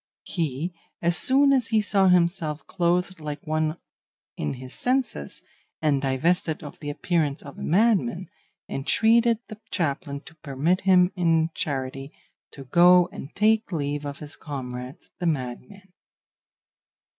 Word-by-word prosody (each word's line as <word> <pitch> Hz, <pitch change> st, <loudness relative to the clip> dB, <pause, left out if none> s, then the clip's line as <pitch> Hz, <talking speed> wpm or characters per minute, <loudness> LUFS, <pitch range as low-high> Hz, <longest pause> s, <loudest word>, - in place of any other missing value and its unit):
He, 160 Hz, 0 st, -3 dB, 0.3 s
as 170 Hz, 0 st, +1 dB
soon 275 Hz, +4 st, +5 dB
as 255 Hz, -4 st, +2 dB
he 220 Hz, -1 st, +2 dB
saw 200 Hz, -2 st, +2 dB
himself 170 Hz, -4 st, +1 dB
clothed 180 Hz, 0 st, 0 dB
like 150 Hz, -2 st, -6 dB
one 155 Hz, +1 st, -1 dB, 0.6 s
in 75 Hz, -, -3 dB
his 130 Hz, +1 st, -9 dB
senses, 250 Hz, -, -2 dB, 0.4 s
and 145 Hz, -3 st, +1 dB
divested 155 Hz, +5 st, 0 dB
of 145 Hz, -, -10 dB
the 145 Hz, -, -5 dB
appearance 150 Hz, -1 st, -1 dB
of 140 Hz, -, -11 dB
a -, -, -8 dB
madman, 190 Hz, -, +2 dB, 0.4 s
entreated 230 Hz, -, +3 dB
the 215 Hz, -1 st, -10 dB
chaplain 140 Hz, -4 st, -2 dB
to 160 Hz, -, -14 dB
permit 155 Hz, +4 st, 0 dB
him 185 Hz, -1 st, +4 dB
in 165 Hz, -2 st, +2 dB
charity 135 Hz, 0 st, -4 dB, 0.4 s
to 140 Hz, -, -11 dB
go 175 Hz, +5 st, +5 dB
and 140 Hz, -, -9 dB
take 220 Hz, +1 st, +2 dB
leave 145 Hz, -3 st, -2 dB
of 140 Hz, -1 st, -5 dB
his 150 Hz, 0 st, -7 dB
comrades 130 Hz, -1 st, -7 dB
the 175 Hz, -, -1 dB
madmen. 165 Hz, +8 st, -4 dB
160 Hz, 135 wpm, -25 LUFS, 140-185 Hz, 0.6 s, soon